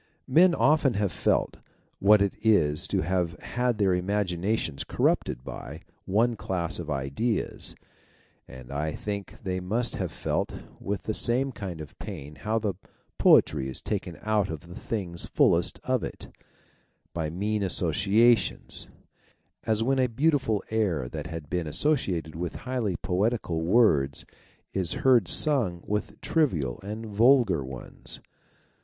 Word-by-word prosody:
Men 170 Hz, +7 st, +5 dB
have -, -, -3 dB
often 130 Hz, -10 st, +3 dB
felt -, -, 0 dB, 0.4 s
what 105 Hz, +1 st, +6 dB
it 100 Hz, -, 0 dB
is 85 Hz, -7 st, +3 dB
to 95 Hz, -, 0 dB
have 90 Hz, 0 st, -1 dB
had 125 Hz, -2 st, 0 dB
their 100 Hz, -2 st, +3 dB
imagi 90 Hz, +1 st, 0 dB
nations 85 Hz, -5 st, -1 dB
corrupted -, -, 0 dB
by -, -, -8 dB, 0.2 s
one 115 Hz, +5 st, +2 dB
class 85 Hz, -6 st, -3 dB
of 80 Hz, -3 st, -6 dB
ideas, 70 Hz, -, -2 dB, 0.7 s
and 65 Hz, 0 st, -11 dB
I 75 Hz, +2 st, -2 dB
think 100 Hz, -1 st, -5 dB
they 95 Hz, -1 st, -2 dB
must 110 Hz, +6 st, -1 dB
have -, -, -3 dB
felt -, -, -2 dB, 0.2 s
with 100 Hz, -3 st, -3 dB
the 110 Hz, -, -2 dB
same 130 Hz, +5 st, +1 dB
kind 95 Hz, -8 st, -6 dB
of 75 Hz, -, -11 dB
pain 70 Hz, +2 st, -7 dB
how 110 Hz, +1 st, -1 dB
the 105 Hz, -3 st, -1 dB, 0.5 s
poetry 65 Hz, 0 st, +5 dB
is 65 Hz, -, -3 dB
taken -, -, -4 dB
out 105 Hz, -2 st, +1 dB
of 80 Hz, -3 st, -5 dB
the 85 Hz, 0 st, -12 dB
things 90 Hz, -4 st, -3 dB
fullest -, -, +2 dB
of -, -, 0 dB
it, -, -, -7 dB, 0.8 s
by 80 Hz, -2 st, -2 dB
mean 105 Hz, +6 st, -1 dB
associations, 100 Hz, +6 st, +2 dB, 0.8 s
as 110 Hz, 0 st, +2 dB
when 135 Hz, +2 st, +1 dB
a 130 Hz, -, +3 dB
beautiful 130 Hz, -4 st, +1 dB
air 95 Hz, -, 0 dB
that 75 Hz, +1 st, -6 dB
had 80 Hz, -3 st, -7 dB
been 90 Hz, -1 st, -2 dB
associated 85 Hz, -, 0 dB
with 85 Hz, +1 st, -4 dB
highly 125 Hz, -7 st, -1 dB
poetical 90 Hz, -2 st, -1 dB
words 80 Hz, -, +3 dB, 0.5 s
is 95 Hz, -3 st, 0 dB
heard 120 Hz, -8 st, +5 dB
sung 105 Hz, -, +3 dB
with 105 Hz, 0 st, -3 dB
trivial 85 Hz, -, 0 dB
and 105 Hz, +3 st, -6 dB
vulgar 110 Hz, -, +4 dB
ones. 65 Hz, -1 st, -8 dB
100 Hz, 140 wpm, -27 LUFS, 85-115 Hz, 0.8 s, what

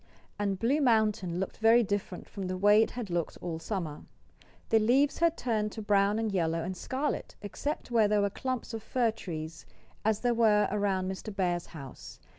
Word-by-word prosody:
And 200 Hz, -2 st, 0 dB
Blue 265 Hz, +10 st, +1 dB
Mountain 215 Hz, -8 st, +2 dB
looked 190 Hz, -, -4 dB
very 225 Hz, +2 st, +5 dB
different 200 Hz, -3 st, -3 dB
from 195 Hz, -2 st, -6 dB
the 185 Hz, 0 st, -3 dB
way 205 Hz, +3 st, +6 dB
it -, -, +2 dB
had 230 Hz, -6 st, -6 dB
looked 170 Hz, -2 st, -2 dB
all 165 Hz, -2 st, -4 dB
summer. 165 Hz, -5 st, -4 dB, 0.7 s
The 225 Hz, -, +5 dB
leaves 260 Hz, +6 st, +3 dB
had 335 Hz, -1 st, +2 dB
turned 215 Hz, -3 st, -1 dB
to 220 Hz, -, -6 dB
brown 205 Hz, 0 st, +3 dB
and 225 Hz, -1 st, -1 dB
yellow 165 Hz, -3 st, 0 dB
and 185 Hz, +2 st, -4 dB
scarlet, 265 Hz, +10 st, -3 dB
except 255 Hz, +7 st, -4 dB
where 225 Hz, -3 st, +4 dB
there 210 Hz, 0 st, +2 dB
were 200 Hz, 0 st, +1 dB
clumps 255 Hz, +1 st, -4 dB
of 225 Hz, -, -4 dB
fir 235 Hz, +1 st, +1 dB
trees, 160 Hz, -6 st, -7 dB, 0.4 s
as 220 Hz, -1 st, +1 dB
there 245 Hz, -1 st, +2 dB
were 215 Hz, -3 st, +4 dB
around 195 Hz, -2 st, 0 dB
Mr. 190 Hz, +3 st, -5 dB
Bear's 175 Hz, -3 st, -1 dB
house. 140 Hz, -6 st, -10 dB
205 Hz, 190 wpm, -30 LUFS, 185-225 Hz, 0.7 s, way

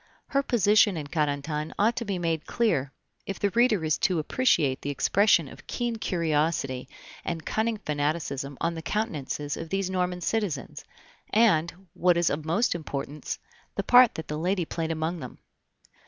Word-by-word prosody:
Her 275 Hz, -, +2 dB
position 210 Hz, -6 st, +4 dB
in 150 Hz, -, -4 dB
Carentan 150 Hz, 0 st, -2 dB
ought 225 Hz, +4 st, +3 dB
to 235 Hz, -, -2 dB
be 200 Hz, -3 st, -2 dB
made 165 Hz, -3 st, -2 dB
clear, 145 Hz, -, +1 dB, 0.4 s
if 195 Hz, -, -3 dB
the 200 Hz, -, +1 dB
reader 230 Hz, -7 st, +3 dB
is 155 Hz, -, +1 dB
to 185 Hz, -3 st, +2 dB
appreciate 155 Hz, -, +2 dB
the 145 Hz, -, -4 dB
expression 165 Hz, +4 st, +3 dB
of -, -, -13 dB
keen 240 Hz, -2 st, -2 dB
curiosity 155 Hz, -8 st, -1 dB, 0.3 s
and 165 Hz, -2 st, -4 dB
cunning 220 Hz, 0 st, 0 dB
fanaticism 145 Hz, -4 st, -2 dB
on 170 Hz, +1 st, 0 dB
the 165 Hz, -, -6 dB
countenances 150 Hz, -, -2 dB
of 165 Hz, -, -7 dB
these 195 Hz, 0 st, -1 dB
Norman 180 Hz, -1 st, -1 dB
citizens, 190 Hz, -8 st, -2 dB, 0.5 s
and, 190 Hz, -5 st, +2 dB
what 180 Hz, -1 st, +3 dB
is 170 Hz, -1 st, +2 dB
of 150 Hz, +1 st, -3 dB
most 200 Hz, +10 st, +2 dB
importance, 150 Hz, -3 st, -5 dB, 0.4 s
the -, -, -1 dB
part 250 Hz, -1 st, +6 dB
that 160 Hz, -, -6 dB
the 150 Hz, 0 st, -3 dB
lady 180 Hz, +1 st, 0 dB
played 165 Hz, 0 st, -3 dB
among 165 Hz, +2 st, -2 dB
them. 125 Hz, -4 st, -8 dB
170 Hz, 165 wpm, -27 LUFS, 150-205 Hz, 0.5 s, part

